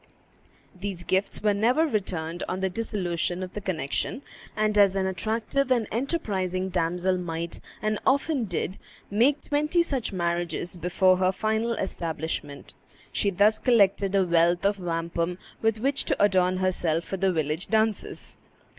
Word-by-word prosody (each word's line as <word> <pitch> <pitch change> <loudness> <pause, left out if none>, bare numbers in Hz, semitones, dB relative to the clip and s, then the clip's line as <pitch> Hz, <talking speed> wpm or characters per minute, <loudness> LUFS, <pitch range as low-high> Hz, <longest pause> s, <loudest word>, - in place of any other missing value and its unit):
These 190 -1 -5
gifts 190 +3 -1
were 210 -1 +4
never 245 +10 +3
returned 175 - -2
on 185 - -2
the 190 -1 -1
dissolution 180 -4 -2
of 185 - -7
the 210 - -5
connection; 185 - -2 0.3
and 215 0 +1
as 200 -2 +5
an 190 -1 +1
attractive 220 +8 -1
and 240 -4 +2
enterprising 195 - -1
damsel 180 +1 0
might, 170 -1 -4 0.2
and 215 0 0
often 275 -2 +2
did, 185 0 -3 0.3
make 250 +8 +3
twenty 300 +4 +2
such 270 -9 -2
marriages 170 -1 -2
before 180 +2 +3
her 185 0 +3
final 220 +4 0
establishment, 160 -7 -4 0.4
she 200 - +1
thus 205 +3 +3
collected 200 -5 +3
a 195 -1 +4
wealth 170 +1 +3
of 200 0 +2
wampum 170 0 -2 0.2
with 225 0 +2
which 275 +4 0
to - - +1
adorn 185 -2 +3
herself 175 -3 0
for 195 - -4
the 190 0 +2
village 155 +1 -1
dances. 220 -1 -1
190 Hz, 145 wpm, -26 LUFS, 175-220 Hz, 0.4 s, as